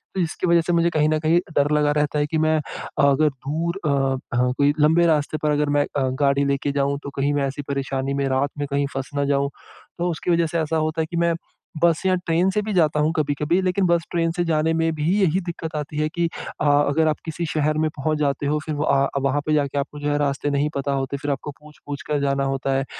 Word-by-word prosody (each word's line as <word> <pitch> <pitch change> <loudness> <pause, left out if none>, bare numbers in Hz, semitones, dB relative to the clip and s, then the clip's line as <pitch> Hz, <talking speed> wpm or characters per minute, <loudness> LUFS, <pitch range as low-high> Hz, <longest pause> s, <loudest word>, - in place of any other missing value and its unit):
तो - - -1
इसकी 170 +2 -2
वज़ह 170 -1 +5
से 175 +1 -1
मुझे 170 0 +3
कहीं 155 -2 +2
न 155 0 +1
कहीं 160 +2 +3 0.2
डर 145 +1 +3
लगा 150 0 +2
रहता 150 0 0
है 145 - +2
कि 160 +1 -1
मैं 155 0 +2 0.5
अगर 145 +2 +4
दूर 160 +7 -3
अ - - +2 0.5
अ, 125 0 +2
कोई 145 +1 +3
लंबे 160 +3 +4
रास्ते 155 -1 +1
पर 150 - +2
अगर 150 0 +1
मैं 145 0 +2
अ, 135 -2 +1
गाड़ी 140 0 +3
लेके 140 +1 0
जाऊँ 140 0 0
तो - - -5
कहीं 140 +1 +1
मैं 140 -1 +1
ऐसी 135 +2 -5
परेशानी 135 -1 -2
में, 140 0 0
रात 135 +2 +1
में 145 -1 -2
कहीं 140 0 +1
फँस 135 0 -4
ना 145 0 +1
जाऊँ। 140 0 +1 0.5
तो 175 0 0
उसकी 170 +2 -2
वज़ह 170 0 +3
से 165 +1 -2
ऐसा 160 0 0
होता 155 +1 0
है 160 - 0
कि 170 - -2
मैं 170 0 +2 0.5
बस 170 -2 +4
या 185 - +3
ट्रेन 175 +1 +1
से 210 +2 0
भी 210 0 -3
जाता 155 -4 +2
हूँ 155 +2 +2
कभी-कभी, 150 +4 +1
लेकिन 185 +1 +1
बस 170 -1 +2
ट्रेन 165 -1 +1
से 175 +1 -1
जाने 160 0 +1
में 165 0 +1
भी 150 0 -2 0.2
यही 185 -1 +2
दिक्कत 165 -2 -5
आती 150 0 -4
है 155 - +1
कि 170 0 +1 0.3
अ, - - +1
अगर 145 +2 +3
आप 155 - +1
किसी 165 +1 -3
शहर 155 0 +1
में 155 0 +1
पहुँच 155 +2 0
जाते 140 -1 0
हो 150 +1 +1
फ़िर 155 - -3
व 140 -2 +2 0.2
वहाँ 140 +2 +1
पे 155 - +1
जाके 145 -1 0
आपको 145 +1 -5
जो 145 - -2
है 145 - +1
रास्ते 145 0 0
नहीं 145 +1 +1
पता 140 0 -1
होते 135 0 -2
फ़िर 145 +1 -3
आपको 145 +1 -4
पूछ-पूछ 150 -1 -9
कर 150 -1 0
जाना 140 0 +1
होता 135 0 -1
है। 135 - -1
150 Hz, 255 wpm, -22 LUFS, 140-160 Hz, 0.5 s, वज़ह